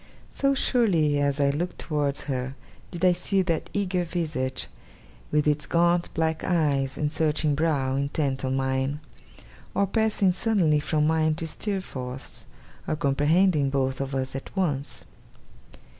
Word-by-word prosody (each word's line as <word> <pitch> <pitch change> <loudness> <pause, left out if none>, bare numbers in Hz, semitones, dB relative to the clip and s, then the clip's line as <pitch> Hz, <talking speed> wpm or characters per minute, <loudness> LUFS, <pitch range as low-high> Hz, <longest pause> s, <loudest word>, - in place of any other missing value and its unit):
So 275 0 +1
surely 175 - +2
as 140 0 +1
I 140 -1 +3
looked 170 +5 -3
towards 145 -3 -1
her, 130 -1 -3 0.3
did 175 +1 -2
I 180 - +7
see 190 +2 +1
that 170 -3 -1
eager 185 -3 0
visage, 155 -7 -2 0.7
with 150 0 +2
its 150 -1 +1
gaunt 170 +1 +2
black 160 0 0
eyes 140 -6 +1
and 150 -1 -1
searching 155 -1 +1
brow, 140 -3 +1
intent 140 -1 -1
on 130 0 0
mine; 135 +2 -1 0.8
or 200 - +3
passing 215 -2 +2
suddenly 180 -6 +2
from 150 0 0
mine 155 0 +2
to 165 +1 -4
Steerforth's; 145 -9 -5 0.4
or - - 0
comprehending 150 +2 +2
both 135 -1 -1
of 135 0 -3
us 130 0 -2
at 135 - -7
once. 145 -7 -2
150 Hz, 145 wpm, -26 LUFS, 140-175 Hz, 0.8 s, I